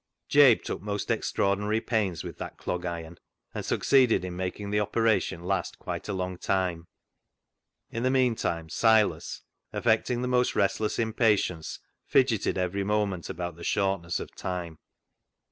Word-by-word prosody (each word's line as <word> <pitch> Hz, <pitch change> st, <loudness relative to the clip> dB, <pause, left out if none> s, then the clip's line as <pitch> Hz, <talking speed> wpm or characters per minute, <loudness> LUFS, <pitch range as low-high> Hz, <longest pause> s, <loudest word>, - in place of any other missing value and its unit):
Jabe 140 Hz, -5 st, +7 dB
took -, -, -4 dB
most 100 Hz, 0 st, -3 dB
extraordinary 105 Hz, +2 st, +1 dB
pains 105 Hz, -7 st, -1 dB
with -, -, -8 dB
that -, -, -6 dB
clog 90 Hz, 0 st, -3 dB
iron, 85 Hz, -1 st, -6 dB, 0.3 s
and -, -, -4 dB
succeeded 130 Hz, -8 st, +3 dB
in 90 Hz, -1 st, -5 dB
making 95 Hz, +3 st, -4 dB
the 105 Hz, -, +2 dB
opera 110 Hz, +1 st, +2 dB
tion 85 Hz, -2 st, -6 dB
last 95 Hz, +1 st, -2 dB
quite -, -, -6 dB
a -, -, -1 dB
long 90 Hz, -1 st, -3 dB
time. 90 Hz, -3 st, -1 dB, 1.0 s
In 115 Hz, -, -3 dB
the 130 Hz, -, +2 dB
meantime, 120 Hz, -11 st, +1 dB
Silas, 105 Hz, -3 st, +2 dB, 0.3 s
affecting 120 Hz, +2 st, +1 dB
the -, -, -1 dB
most 125 Hz, 0 st, +2 dB
restless 105 Hz, +2 st, +1 dB
impatience, 110 Hz, -7 st, +1 dB, 0.3 s
fidgeted 120 Hz, -7 st, +2 dB
every 95 Hz, +2 st, -1 dB
moment 100 Hz, -3 st, -1 dB
about 85 Hz, -1 st, -5 dB
the 85 Hz, -, -10 dB
shortness 95 Hz, -4 st, 0 dB
of -, -, -8 dB
time. 90 Hz, -4 st, -5 dB
100 Hz, 145 wpm, -28 LUFS, 90-110 Hz, 1.0 s, Jabe